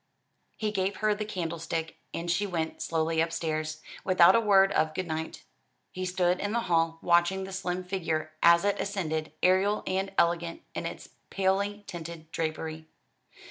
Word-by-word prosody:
He 215 Hz, -1 st, -1 dB
gave 195 Hz, -1 st, -1 dB
her 215 Hz, 0 st, +2 dB
the 210 Hz, +1 st, -4 dB
candlestick, 165 Hz, -4 st, -3 dB
and 170 Hz, 0 st, -2 dB
she 205 Hz, +4 st, +1 dB
went 165 Hz, -4 st, -3 dB
slowly 160 Hz, 0 st, +1 dB
upstairs, 155 Hz, -1 st, -2 dB, 0.2 s
without 185 Hz, -1 st, +6 dB
a -, -, +6 dB
word 195 Hz, -3 st, +5 dB
of 155 Hz, 0 st, +1 dB
good 185 Hz, -, -2 dB
night. 160 Hz, -1 st, -4 dB, 0.5 s
He 185 Hz, 0 st, -4 dB
stood 180 Hz, 0 st, +1 dB
in 205 Hz, +1 st, -2 dB
the 235 Hz, -, +1 dB
hall, 165 Hz, -4 st, +1 dB
watching 175 Hz, +2 st, +3 dB
the 190 Hz, 0 st, -7 dB
slim 185 Hz, -1 st, -2 dB
figure 165 Hz, -4 st, -2 dB
as 170 Hz, +2 st, +6 dB
it 205 Hz, -, +1 dB
ascended, 160 Hz, -7 st, -2 dB
aerial 190 Hz, +3 st, +3 dB
and 190 Hz, +1 st, -1 dB
elegant 170 Hz, 0 st, +1 dB
in -, -, -3 dB
its -, -, -8 dB, 0.2 s
palely 200 Hz, +2 st, 0 dB
tinted 165 Hz, -2 st, -8 dB
drapery. 160 Hz, -1 st, -3 dB
175 Hz, 160 wpm, -29 LUFS, 165-195 Hz, 0.5 s, without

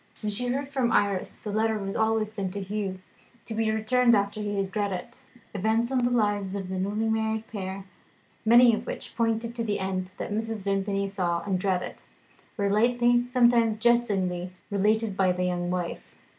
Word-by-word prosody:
When 210 Hz, -, -1 dB
she 245 Hz, +5 st, -3 dB
heard 270 Hz, +3 st, -1 dB
from 265 Hz, -4 st, 0 dB
Iris 200 Hz, -4 st, +1 dB
the 210 Hz, -, -6 dB
letter 220 Hz, +1 st, +1 dB
was 195 Hz, -1 st, -4 dB
always 220 Hz, -1 st, +1 dB
sent 200 Hz, -3 st, -4 dB
to -, -, -2 dB
Hugh, 195 Hz, -1 st, -3 dB, 0.5 s
to 225 Hz, -, -5 dB
be 220 Hz, 0 st, 0 dB
returned 235 Hz, +2 st, +3 dB
after 200 Hz, +1 st, 0 dB
he 205 Hz, -1 st, -2 dB
had 195 Hz, -1 st, -2 dB
read 205 Hz, -1 st, 0 dB
it. 235 Hz, +8 st, -6 dB, 0.3 s
Events 220 Hz, +4 st, +1 dB
in 260 Hz, -, +2 dB
the 245 Hz, 0 st, +2 dB
lives 205 Hz, -5 st, 0 dB
of 195 Hz, -2 st, -4 dB
the 190 Hz, 0 st, -3 dB
newly 210 Hz, +4 st, -1 dB
married 220 Hz, 0 st, 0 dB
pair, 190 Hz, -2 st, -5 dB, 0.6 s
many 235 Hz, +1 st, +7 dB
of 220 Hz, -, -3 dB
which -, -, -6 dB
pointed 230 Hz, 0 st, 0 dB
to 235 Hz, -, -2 dB
the 210 Hz, -2 st, -1 dB
end 185 Hz, -1 st, -2 dB
that -, -, -4 dB
Mrs. 220 Hz, -1 st, -3 dB
Vimpany 195 Hz, 0 st, 0 dB
saw 180 Hz, -4 st, -1 dB
and 190 Hz, -1 st, -1 dB
dreaded, 185 Hz, -1 st, -1 dB, 0.6 s
were 200 Hz, -2 st, +1 dB
lightly, 240 Hz, +3 st, +3 dB
sometimes 235 Hz, -3 st, +4 dB
jestingly, 200 Hz, -7 st, +1 dB, 0.2 s
related 210 Hz, +1 st, +1 dB
by 190 Hz, -1 st, +3 dB
the 180 Hz, 0 st, -1 dB
young 175 Hz, -1 st, -1 dB
wife. 180 Hz, -1 st, -4 dB
210 Hz, 185 wpm, -27 LUFS, 195-225 Hz, 0.6 s, many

